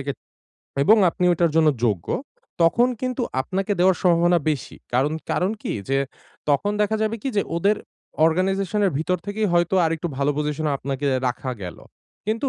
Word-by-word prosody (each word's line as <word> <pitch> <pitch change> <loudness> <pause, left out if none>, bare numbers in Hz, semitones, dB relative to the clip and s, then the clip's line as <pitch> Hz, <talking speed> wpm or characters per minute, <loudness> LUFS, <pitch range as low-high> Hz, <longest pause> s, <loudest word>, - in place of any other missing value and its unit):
গে 140 - 0 0.7
এবং 215 +9 +6
আপনি 180 - -2
ওইটার 170 -1 +2
জন্য 160 -1 +5 0.2
যোগ্য। 100 -6 -1 0.6
তখন 235 +9 +4
কিন্তু 255 0 -2 0.2
আপনাকে 190 +8 -2
দেওয়ার 185 0 +5
সম্ভাবনা 175 0 +4
বেশি। 145 -4 -4 0.2
কারণ 135 +5 +2 0.2
কারণ 185 +2 +1
কি - - -2 0.2
যে 135 - +2 0.5
তখন 175 +9 +2
দেখা 215 +1 +1
যাবে 220 +1 0
কি - - -1
যে 200 - +3
ওদের 200 +5 +2 0.5
অর্গানাইজেশন 190 +4 0
এর - - +2
ভিতর 180 +4 0
থেকেই 210 +1 -1
হয়তো 175 +1 +2
আরেকটু 165 +1 -1
ভালো 140 +1 +2
পজিশন 150 +1 -1
এ - - 0
আপনাকে 140 +1 -3 0.2
রাখা 125 +1 -2
গেল। 90 - -7 0.5
কিন্তু 225 +6 0
175 Hz, 170 wpm, -23 LUFS, 150-200 Hz, 0.7 s, এবং